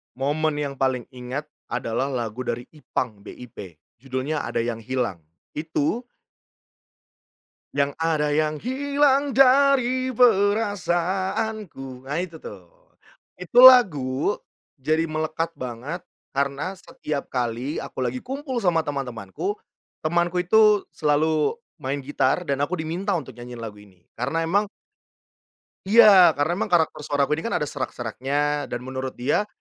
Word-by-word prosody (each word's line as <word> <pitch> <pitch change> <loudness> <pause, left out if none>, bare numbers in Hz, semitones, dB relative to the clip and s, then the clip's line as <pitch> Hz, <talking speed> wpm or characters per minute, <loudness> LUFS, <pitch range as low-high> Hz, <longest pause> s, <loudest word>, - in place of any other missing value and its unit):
Momen 150 +4 0
yang 145 -2 -3
paling 130 -2 +1
ingat, 125 +3 -5 0.2
adalah 120 +2 -2
lagu 120 -4 -4
dari 120 +1 -2
Ipang, 125 -7 -4
BIP. 125 +1 -11 0.4
Judulnya 135 +4 -3
"Ada - - -1
Yang 115 -2 -4
Hilang". 120 -9 -1 0.3
Itu 160 - -2 1.7
Yang 140 0 +1
ada 160 -2 +1
yang 150 0 0
hilang 280 +2 +1
dari 260 -1 +4
perasaanku. 195 - 0
Nah, 145 +4 -2
itu 170 -3 -6
tuh. 95 - -11 0.7
Itu 240 +8 +6
lagu, 165 - +6 0.4
jadi 155 +4 0
melekat 155 +1 -2
banget, 130 +8 -5 0.3
karena 140 +7 -1
setiap 150 -5 -5
kali 125 +3 -2
aku - - -8
lagi 125 +1 -2
kumpul 265 -2 -4
sama 165 -5 +2
teman-temanku, 135 - -4 0.5
temanku 175 +2 +1
itu 210 +2 +5
selalu 155 - +1 0.2
main 135 +2 -2
gitar, 145 +4 +1
dan 140 0 0
aku 180 +5 -1
diminta 170 +6 -2
untuk 130 -6 -8
nyanyi 120 0 -9
lagu 110 -2 -7
ini. 95 -4 -21
Karena 140 +8 -1
emang 200 +5 +1 1.2
iya. 195 -5 +8
Karena 145 +3 +1
memang - - -1
karakter 165 -3 +2
suara 145 -1 +1
aku 150 - -1
ini - - -7
kan - - -1
ada 150 - -1
serak-seraknya, 140 +3 -2
dan 120 - -4
menurut 130 0 -5
dia 145 +12 +1
150 Hz, 130 wpm, -24 LUFS, 130-190 Hz, 1.7 s, iya